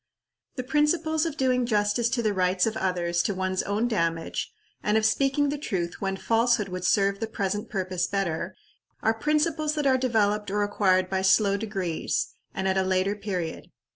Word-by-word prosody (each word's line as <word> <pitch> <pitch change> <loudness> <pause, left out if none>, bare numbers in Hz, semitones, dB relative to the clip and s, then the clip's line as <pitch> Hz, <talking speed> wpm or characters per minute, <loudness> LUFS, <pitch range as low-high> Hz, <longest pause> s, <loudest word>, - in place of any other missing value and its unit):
The 255 - -3
principles 315 +3 +1
of 310 -2 -5
doing 255 -1 +2
justice 210 +1 +1
to 240 -1 -1
the 215 -2 +1
rights 185 -1 +2
of 220 -1 -1
others 175 -4 0
to 205 - -1
one's 185 0 -1
own 210 +4 0
damage, 165 -7 -1 0.3
and 210 +1 +2
of 220 - +2
speaking 275 +5 +2
the 290 0 -3
truth 175 - -3
when 195 -1 -1
falsehood 230 -1 +2
would 180 0 -4
serve 200 -1 +2
the 225 - -2
present 205 +1 -3
purpose 185 -3 -1
better, 195 -5 -2 0.5
are 225 - +3
principles 305 +4 0
that 300 -2 -1
are 260 -1 +4
developed 210 -5 +1
or 205 +1 0
acquired 185 -2 +2
by 190 0 -1
slow 195 +1 +4
degrees, 185 - -2 0.2
and 190 0 -2
at 190 0 +2
a - - +3
later 185 +2 +1
period. 190 -5 -4
205 Hz, 180 wpm, -26 LUFS, 185-240 Hz, 0.5 s, are